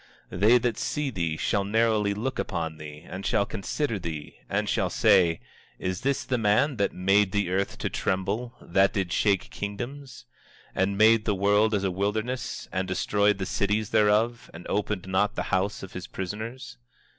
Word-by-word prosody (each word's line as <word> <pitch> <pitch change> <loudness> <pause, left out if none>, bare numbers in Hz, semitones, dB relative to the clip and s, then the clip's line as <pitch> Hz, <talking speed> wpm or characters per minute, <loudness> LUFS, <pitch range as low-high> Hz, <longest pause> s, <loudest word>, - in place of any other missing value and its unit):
24:16 90 - -6
They 110 +5 +6
that 120 -2 -1
see 150 -2 -1
thee 85 -7 -2
shall 100 +4 0
narrowly 105 -1 +2
look 125 +6 -3
upon 80 -1 -3
thee, 75 +1 -10
and 95 +2 -7
shall 100 - +1
consider 110 +3 -2
thee, 80 -4 -6
and - - 0
shall - - +1
say: 85 -3 +4 0.4
Is 95 +3 -3
this 140 +1 0
the 125 -2 -1
man 115 +6 +2
that 100 - +1
made 95 +1 +2
the 100 -3 0
earth 95 +1 -1
to - - -2
tremble, 100 +6 -2
that 95 +3 +3
did 95 -5 -1
shake 100 -3 +1
kingdoms? 125 - -6 0.5
24:17 - - +2
And 100 +1 -1
made 110 +1 +5
the 105 - +1
world 105 +3 +3
as 100 - -1
a 95 - +1
wilderness, 110 +6 -2
and 95 0 -1
destroyed 100 +2 +1
the 95 - -3
cities 105 +2 0
thereof, 110 +2 +2
and 85 - -10
opened 100 -2 -1
not 95 +2 +1
the - - -1
house 95 +2 0
of 95 - -9
his 90 - -6
prisoners? 105 - -6
100 Hz, 180 wpm, -26 LUFS, 95-110 Hz, 0.5 s, They